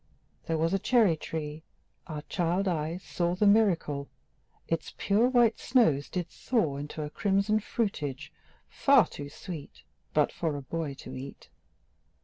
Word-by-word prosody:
There 165 - 0
was 165 +3 +1
a 195 - +2
cherry 220 -4 +4
tree 155 -1 -5 0.5
our 150 -2 -5
child 180 +3 0
eyes 165 +1 -2
saw 175 0 -1
The 210 - +2
miracle: 180 -9 +3 0.6
Its 165 -1 -3
pure 215 +5 +3
white 240 -3 +4
snows 160 - +3
did 180 -2 -3
thaw 170 - -1
Into 150 +2 -5
a 150 - -6
crimson 200 +3 +2
fruitage, 150 - -3 0.4
far 275 -4 +5
too 145 -1 -8
sweet 160 0 -9 0.3
But - - +2
for 160 -3 -2
a 140 - -7
boy 155 0 -3
to - - -9
eat. 135 +2 -9
170 Hz, 145 wpm, -29 LUFS, 150-205 Hz, 0.6 s, far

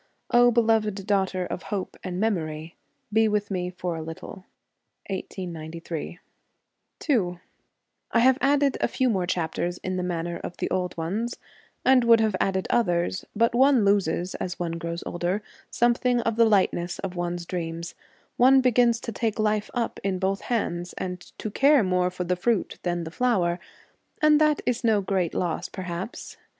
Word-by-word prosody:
O 245 0 +6
beloved 220 -4 +2
daughter 190 -2 +1
of 180 - -5
Hope 200 -3 -4
and 180 -1 -4
Memory, 165 -6 -2 0.4
be 220 0 +4
with 210 -1 -1
me 180 -2 -1
for 180 -1 -4
a 160 - -5
little. 165 +4 -8 0.7
1893. 170 -3 -5 0.9
11 185 - +1 0.7
I 230 - +3
have 260 +3 +5
added 280 0 +2
a - - +3
few 255 -2 +1
more 185 -4 0
chapters 175 0 -1
in 185 0 -2
the - - -1
manner 170 -1 -2
of - - -7
the - - -3
old 180 -1 -1
ones, 205 +9 -2 0.5
and 260 -1 +6
would 230 -1 +6
have 220 -3 +1
added 190 -1 0
others, 175 -4 +1
but 230 +2 +3
one 260 -2 +5
loses, 185 -3 +1
as 180 - -4
one 170 -1 -3
grows 170 +1 -4
older, 180 +4 -2 0.3
something 240 +1 +2
of 230 -1 -1
the 230 0 +5
lightness 185 -4 +1
of 185 -2 -5
one's 175 0 -3
dreams; 170 -1 -4 0.4
one 265 +2 +6
begins 245 -2 +3
to 230 - -4
take 220 0 -2
life 215 -1 0
up 235 -2 -2
in 190 -1 0
both 195 +1 -1
hands, 175 -7 -2
and 180 -1 -4 0.2
to 215 - -5
care 280 +1 +5
more 180 -1 +1
for 180 0 -4
the 180 +1 0
fruit 210 +3 -1
than 175 -1 -1
the 160 - -7
flower, 180 -6 +1 0.6
and 305 0 +5
that 305 -1 +3
is 245 0 0
no 220 -3 +4
great 185 -3 -1
loss 175 -3 -2
perhaps. 180 +2 -6
190 Hz, 165 wpm, -25 LUFS, 175-230 Hz, 0.9 s, O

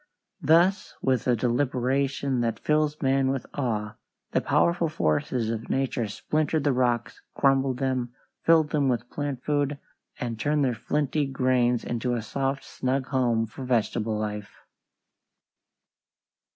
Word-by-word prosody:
Thus 170 +6 +3
with 130 -3 +1
a 125 - +4
deliberation 130 +2 0
that 115 -2 0
fills 150 +2 0
man 135 0 +3
with 135 -1 -2
awe, 110 -6 -2 0.3
the - - +2
powerful 170 -1 +2
forces 115 - 0
of 115 0 -5
nature 130 -3 0
splintered 155 +8 -1
the 145 -2 +2
rocks, 120 -2 0
crumbled 135 -2 +2
them, 130 -3 -1 0.3
filled 160 -2 +4
them 145 -3 +2
with 120 -1 -2
plant 145 -4 -4
food, 145 -1 0 0.4
and 115 -2 -4
turned 145 +3 +2
their 125 - +1
flinty 145 +5 -1
grains 125 -2 +1
into 120 +1 -1
a 115 - -3
soft, 135 +4 -2
snug 130 +1 -2
home 120 -4 +2
for 115 +5 -9
vegetable 115 -3 0
life. 105 -2 -5
130 Hz, 135 wpm, -26 LUFS, 120-140 Hz, 0.4 s, a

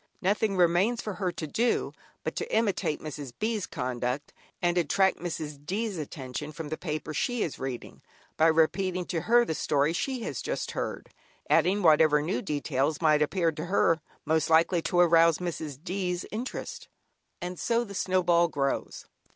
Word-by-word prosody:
Nothing 200 +1 +1
remains 180 +7 +3
for 210 - -4
her 185 -2 -2
to 160 - -5
do 230 +10 0 0.3
but - - -3
to 460 - -4
imitate 200 -8 0
Mrs. 145 -4 -6
B's 215 -2 -1
conduct, 125 +2 -3 0.3
and 175 0 +1
attract 190 +3 +2
Mrs. 155 -4 -5
D's 200 +3 -2
attention 145 0 -6
from 155 0 -7
the 155 - -2
paper 155 -2 -4
she 245 +7 0
is 155 - -4
reading, 130 -2 -6 0.3
by 160 - +4
repeating 180 +3 +2
to 170 -2 -2
her 240 +4 +4
the 160 - -2
story 150 0 +1
she 255 +6 -2
has - - -4
just - - -3
heard, - - -4 0.4
adding 195 +2 +3
whatever 155 -2 +6
new 165 +7 -1
details 145 -3 -1
may 155 -2 +4
appear 165 +2 +2
to 155 +1 -6
her 180 -1 +3
as 165 - 0 0.3
most 160 0 +1
likely 165 +2 +4
to 175 - 0
arouse 165 -2 +5
Mrs. 160 -5 -4
D's. 180 -1 -2
interest. 235 +5 -5 0.5
And 180 0 -5
so 235 0 +1
the 200 -4 -9
snowball 180 -3 +3
grows. 140 -3 -2
170 Hz, 165 wpm, -28 LUFS, 150-190 Hz, 0.5 s, whatever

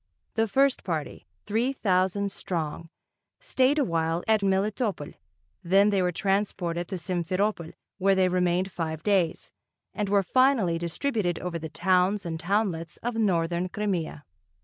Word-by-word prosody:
The 225 -1 +1
first 270 +5 +2
party, 160 -5 -4 0.2
three 230 +6 0
thousand 195 -2 +1
strong, 165 -3 -4 0.5
stayed 280 - +2
a 295 - +3
while 165 -3 -1
at 220 -1 +3
Melitopol, 200 - -1 0.5
then 195 +4 +4
they 195 -2 +2
were 180 0 +1
transported 180 -3 -1
to 190 - -4
Simferopol 180 +1 -2 0.3
where 195 +1 +3
they 190 -1 +3
remained 180 +1 +1
five 160 -3 -4
days, 185 -5 +1 0.4
and 210 -2 -2
were 200 -1 +3
finally 230 -6 +3
distributed 175 - -1
over 175 -2 -4
the 160 0 -6
towns 185 +4 +1
and 165 -1 -4
townlets 175 -3 -1
of 240 +1 -1
northern 180 -5 0
Crimea. 180 -7 -3
185 Hz, 140 wpm, -27 LUFS, 170-210 Hz, 0.5 s, then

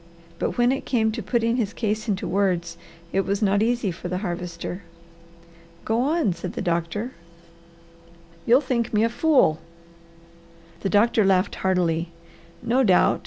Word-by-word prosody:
But - - -2
when 240 +1 +4
it 270 - -2
came 220 -3 +1
to 230 +1 -4
putting 230 +3 0
his 220 -4 -1
case 215 -1 -2
into 200 -3 -1
words, 180 -3 0 0.4
it 195 - +3
was 200 +2 -1
not 200 0 +2
easy 235 -3 +1
for 175 +1 -7
the 180 +1 -2
Harvester. 175 +1 -5 1.0
"Go 225 +2 +1
on!" 295 - +1
said 180 +2 -6
the - - -4
doctor. 170 +7 -2 1.4
"You'll 245 +4 +6
think 240 -5 -1
me 210 - +3
a 230 - +2
fool." 255 - +3 1.2
The 195 - -2
doctor 215 +2 +3
laughed 190 0 +2
heartily. 175 -3 0 0.5
"No 255 +3 +2
doubt!" 185 -6 +4
205 Hz, 150 wpm, -24 LUFS, 180-235 Hz, 1.4 s, You'll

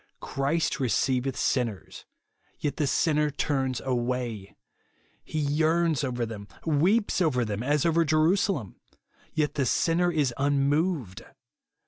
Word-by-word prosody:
Christ 145 +3 -1
receiveth 130 +2 0
sinners; 115 -7 -2 0.5
yet 145 - -3
the 150 - +1
sinner 150 +1 +2
turns 135 -3 -1
away! 120 -5 -3 0.7
He - - -6
yearns 155 +1 +1
over 125 -3 -1
them, 105 -3 -8 0.2
weeps 185 +8 +2
over 130 -8 +2
them, 105 0 -3
as 145 +4 +1
over 165 0 +3
Jerusalem; 160 - +1 0.6
yet 150 -2 +1
the 140 - 0
sinner 175 +1 +2
is 145 -7 +1
unmoved 140 - 0
145 Hz, 115 wpm, -27 LUFS, 125-160 Hz, 0.7 s, over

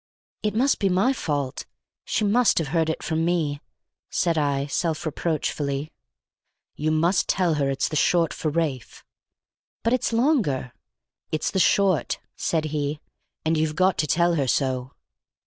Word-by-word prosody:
"It 210 -1 -1
must 265 +5 +2
be 195 - +2
my 190 +9 +3
fault! 145 - -3 0.4
She 210 - 0
must 230 +3 +3
have 160 -4 0
heard 160 0 +1
it 160 - -3
from 160 0 -1
me," 160 -4 0 0.5
said 170 -1 +1
I 140 -2 0
self 160 +2 -2
reproachfully. 150 -2 -2 0.8
"You 155 +1 -2
must 165 +4 +2
tell 180 -4 +2
her 135 - +1
it's 135 - 0
the 155 - -5
short 165 +1 +2
for 155 - -2
Ralph." 150 -5 -3 0.8
"But 230 - +2
it's 255 - +1
longer." 225 - +1 0.6
"It's 155 - -1
the 190 - 0
short," 190 -1 +2 0.2
said 160 -2 -1
he; 145 0 -2 0.5
"and 160 0 +2
you've 155 -1 0
got 185 +1 +2
to 155 - +1
tell 170 +2 +3
her 140 -5 0
so." 130 0 0
160 Hz, 155 wpm, -24 LUFS, 145-185 Hz, 0.8 s, my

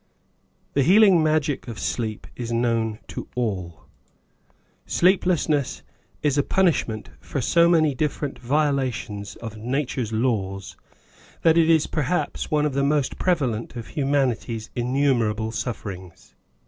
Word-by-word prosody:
THE 140 - +3
healing 190 +2 +6
magic 155 -3 0
of 115 -2 -6
sleep 110 -3 -3
is 120 -1 -5
known 115 -2 0
to - - -6
all. 95 -9 -3 1.1
Sleeplessness 175 -6 +2 0.4
is 145 -1 +2
a - - +6
punishment 140 - 0
for 140 - -4
so 170 +7 +4
many 155 -4 +3
difFei; 145 +1 -1
ent - - -15
violations 130 -7 -1
of 115 -2 -8
nature's 125 0 -2
laws, 105 -5 -1 0.7
that 165 -1 +5
it 165 -1 +4
is 160 -2 +4
perhaps 165 +3 -2
one 150 -2 +2
of 150 - -1
the 140 +1 +1
most 145 -1 0
prevalent 130 -13 0
of 115 -2 -7
humanity's 130 -6 -1
in 120 +1 -2
numerable 115 -6 +1
sufferings. 95 -7 -6
130 Hz, 130 wpm, -24 LUFS, 115-150 Hz, 1.1 s, healing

